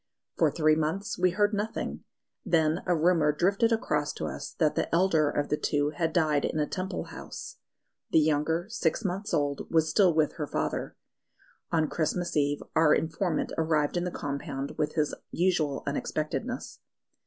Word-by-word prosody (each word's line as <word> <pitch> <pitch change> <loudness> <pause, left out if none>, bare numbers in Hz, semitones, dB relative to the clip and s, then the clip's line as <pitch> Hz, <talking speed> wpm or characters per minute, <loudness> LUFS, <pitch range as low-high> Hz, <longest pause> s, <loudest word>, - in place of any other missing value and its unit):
For - - +3
three 155 -1 +3
months 165 +7 -2
we 185 - +4
heard 205 +3 +1
nothing; 210 +2 -3 0.4
then 160 0 +2
a 175 -2 +3
rumour 160 -2 +3
drifted 195 +9 +2
across 150 -10 0
to - - -4
us - - -6
that 155 -3 +2
the - - -1
elder 165 -4 +3
of 145 0 -1
the 150 - +1
two 145 0 0
had 160 +2 -1
died 155 -4 +2
in - - -1
a 150 - +2
Temple 185 +5 -4
house. - - -8 0.5
The - - +3
younger, 155 +2 +2
six 210 -2 -1
months 195 +3 -2
old, 145 -4 0
was 160 -1 +2
still 190 -1 +5
with 155 -1 +1
her 150 - -3
father. - - -2 0.8
On 160 -2 +2
Christmas 170 +3 -1
Eve 145 -1 +1
our 160 -2 +5
informant 160 +1 -1
arrived 155 -2 +1
in 175 - 0
the 180 - -1
compound 140 -3 -4
with 150 0 -1
his 150 -2 +1 0.2
usual 165 -6 0
unexpectedness. 155 - -3
160 Hz, 165 wpm, -28 LUFS, 150-180 Hz, 0.8 s, still